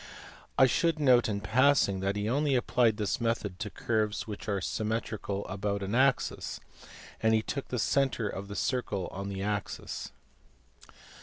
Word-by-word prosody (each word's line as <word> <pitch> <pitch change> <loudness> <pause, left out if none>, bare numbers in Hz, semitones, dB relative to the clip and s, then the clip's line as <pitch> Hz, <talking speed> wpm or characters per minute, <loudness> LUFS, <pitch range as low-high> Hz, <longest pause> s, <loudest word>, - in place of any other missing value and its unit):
I 130 - +8
should 165 +5 +2
note 125 -5 +5
in 100 -1 -2
passing 115 -3 +3
that 100 +1 -1
he 105 +1 -1
only 140 +3 +2
applied 120 -3 +2
this 105 +2 -1
method 110 -5 -1
to 105 - -3
curves 110 -1 -1
which 105 0 -6
are 100 -1 +1
symmetrical 105 -1 -2
about 100 +1 -2
an 95 +2 -3
axis, 135 +1 +1 0.6
and 110 0 +4
he 110 - +1
took 140 +3 -4
the 125 - -3
centre 130 -1 +1
of 100 0 -5
the 100 - -7
circle 105 -7 -1
on 100 +1 -5
the 95 -1 -4
axis. 105 -2 -4
110 Hz, 160 wpm, -30 LUFS, 100-125 Hz, 0.6 s, I